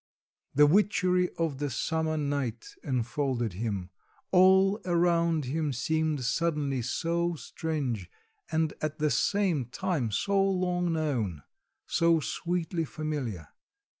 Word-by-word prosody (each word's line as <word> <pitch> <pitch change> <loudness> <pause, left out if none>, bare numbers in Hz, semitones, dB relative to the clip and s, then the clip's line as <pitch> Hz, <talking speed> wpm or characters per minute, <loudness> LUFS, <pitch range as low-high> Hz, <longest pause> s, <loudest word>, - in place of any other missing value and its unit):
The 150 +1 +7
witchery 180 +1 +3
of 160 -5 -1
the 145 -1 -1
summer 160 +4 -1
night 140 -6 -2
enfolded 125 - -1
him; 95 -3 -3 0.4
all 190 +2 +5
around 170 -3 +2
him 150 +3 -1
seemed 155 +1 0
suddenly 145 0 0
so 170 +7 -1
strange 140 - -3 0.4
and 160 -1 +1
at 155 0 -2
the 150 -2 +1
same 190 -10 +1
time 140 -1 -2
so 195 - +1
long 180 -2 0
known; 120 - -1 0.4
so 165 -1 +3
sweetly 170 +2 -2
familiar. 140 - -4
155 Hz, 110 wpm, -29 LUFS, 130-170 Hz, 0.4 s, The